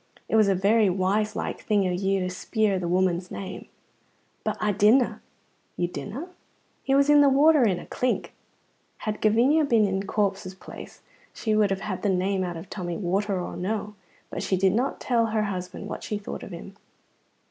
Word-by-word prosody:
It - - 0
was 215 -2 +5
a 195 - +3
very 205 +3 +3
wise 200 +3 0
like - - -4
thing 205 -3 +1
o' - - 0
you 190 +1 0
to 180 - -1
speir 205 +1 0
the 175 - -3
woman's 180 0 +1
name." 190 -1 -7 0.8
"But - - -2
I 210 - +1
didna." 215 +6 +3 0.6
"You 175 - 0
didna!" 255 - -6 0.5
"He 270 - +1
was 280 0 +4
in 295 0 +6
the 285 - +6
water 290 +1 +5
in 195 -6 +2
a - - -8
klink." 250 0 -2 0.6
Had 215 -1 -4
Gavinia 245 +9 +4
been 230 -7 +3
in 195 -1 -1
Corp's 195 -3 -1
place - - -11 0.3
she 220 -2 0
would 210 -1 +3
have 195 0 -2
had 185 -4 -4
the 205 - +1
name 190 +1 +1
out 175 -2 -4
of 165 - -9
Tommy, 175 -3 -4
water 195 +1 -1
or 175 - -5
no 200 +5 -1
water; 210 0 -8 0.4
but - - -4
she 190 - 0
did 190 0 +3
not 250 +5 -1
tell 235 -2 +1
her 215 -1 0
husband 185 -1 -5
what - - -6
she 210 - -3
thought 205 - -7
of - - -8
him. 190 +2 -9
200 Hz, 200 wpm, -26 LUFS, 185-220 Hz, 0.8 s, in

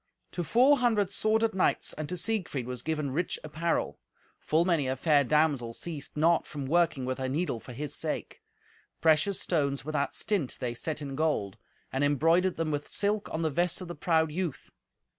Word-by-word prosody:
To 175 - -3
four 255 - +4
hundred 215 -6 +2
sworded 220 +2 +2
knights 185 - +1
and 155 -1 -5
to 180 - -3
Siegfried 180 - -1
was 125 -1 -5
given 150 -2 -2
rich 165 +6 -1
apparel. 155 +2 -2 0.4
Full 160 +2 +1
many 165 -7 +2
a 130 - 0
fair 145 +1 +3
damsel 140 -5 +1
ceased 150 -4 -6
not 165 +2 +3
from 145 -4 -5
working 155 -3 +2
with 130 +1 -3
her 130 0 -2
needle 145 -3 -1
for 125 - -11
his 140 +4 -5
sake. - - -4 0.6
Precious 160 +5 +3
stones 140 -5 0
without 150 -2 -1
stint 195 -11 -1
they 120 -2 -2
set 150 +5 -4
in 135 -1 -5
gold, 145 -11 -1 0.3
and 135 +2 +1
embroidered 165 +6 +3
them 160 -1 -1
with 145 0 -3
silk 205 +1 -1
on 160 - -2
the 160 - +1
vest 175 +4 0
of 185 - -7
the 175 - -5
proud 160 0 +1
youth. 170 -3 -4
155 Hz, 185 wpm, -29 LUFS, 140-175 Hz, 0.6 s, four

